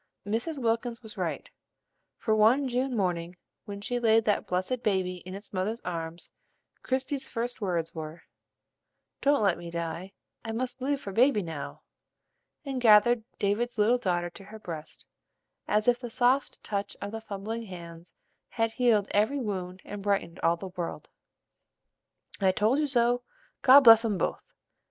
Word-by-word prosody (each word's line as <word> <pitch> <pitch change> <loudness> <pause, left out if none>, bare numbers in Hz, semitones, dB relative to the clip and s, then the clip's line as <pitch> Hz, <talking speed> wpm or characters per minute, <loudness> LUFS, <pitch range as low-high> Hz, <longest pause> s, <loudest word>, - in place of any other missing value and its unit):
Mrs. 235 +10 -2
Wilkins 230 -1 -1
was 220 0 -10
right; - - -3 0.7
for 220 - +1
one 235 +6 +4
June 255 0 -1
morning, 175 -2 -1 0.3
when 200 -1 -7
she 245 +4 -2
laid 225 -1 +4
"that 210 - +1
blessed 185 +7 -1
baby" 185 -4 0
in 185 - -6
its 205 +1 -11
mother's 200 +5 -1
arms, 165 -1 -6 0.5
Christie's 265 +1 -2
first 240 0 -4
words 170 -5 -1
were: 160 0 -7 1.0
"Don't 285 -4 +3
let 185 -4 +2
me 170 0 -7
die: 170 +3 -5 0.3
I 225 - -4
must 250 +2 -3
live 280 +1 0
for 200 - -7
baby 240 -1 +4
now," 160 -4 -7 0.8
and 270 -2 -3
gathered 225 +1 +6
David's 225 +4 0
little 225 +4 +4
daughter 175 -5 -1
to 195 - -12
her 220 - -10
breast, 165 -7 -8 0.6
as 210 +2 +1
if 245 0 +4
the 245 -2 -6
soft 255 +3 +1
touch 200 -1 -3
of 200 - -5
the 225 0 -5
fumbling 220 +2 -5
hands 170 -2 -10 0.3
had 225 -1 0
healed 225 -4 +2
every 215 +8 +2
wound 190 -5 -4
and 205 0 -7
brightened 195 -4 -1
all 170 - +3
the 190 +2 -7
world. 180 -2 -6 1.3
"I 190 -2 +4
told 215 +8 +2
you 300 - +1
so; 245 -2 +2 0.4
God 270 +2 +9
bless 225 -3 +9
'em 215 -4 0
both!" - - -1
215 Hz, 160 wpm, -28 LUFS, 185-245 Hz, 1.3 s, God